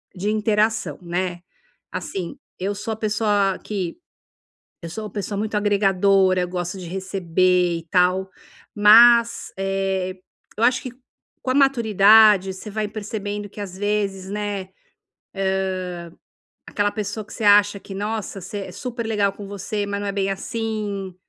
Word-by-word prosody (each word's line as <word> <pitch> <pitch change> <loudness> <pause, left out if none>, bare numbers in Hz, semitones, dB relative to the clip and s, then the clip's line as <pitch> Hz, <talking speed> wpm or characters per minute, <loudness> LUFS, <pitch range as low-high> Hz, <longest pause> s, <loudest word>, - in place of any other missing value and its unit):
de 195 +3 -2
interação, 215 +1 +1
né. 175 0 -3 0.5
Assim, 180 -3 -5 0.2
eu 195 +2 -1
sou 220 +2 -4
a - - -4
pessoa 210 -3 +1
que, 190 -5 -4 0.8
eu 170 - -7
sou 215 +5 -5
uma - - -6
pessoa 205 0 -4
muito 215 +1 -2
agregadora, 195 -2 +3
gosto 180 +1 -4
de 180 - -7
receber 180 -1 +1
e 165 - -15
tal, 185 +2 +2 0.5
mas, 235 +3 +6
eh, 195 -1 -1 0.4
eu 225 - 0
acho 250 +1 +3
que 255 - -6 0.5
com 255 - -4
a - - +1
maturidade 215 -6 +5
você 190 +3 -9
vai 215 0 -2
percebendo 205 -1 -5
que 210 - -12
às 190 -2 -7
vezes, 200 -2 -1
né. 205 -1 -3
Hã, - - -26 2.0
aquela 205 0 0
pessoa 210 0 -4
que - - -13
você 220 - -4
acha 205 0 +5
que 195 - -10
nossa, 205 0 -4
você 195 +3 -6
é - - -9
super 235 +3 -5
legal 205 -3 +1
com 200 0 -9
você, 205 +1 -3
mas 200 0 -3
não 205 - -4
é - - -1
bem 195 -1 -1
assim, 205 -2 -4
205 Hz, 150 wpm, -22 LUFS, 190-215 Hz, 2.0 s, mas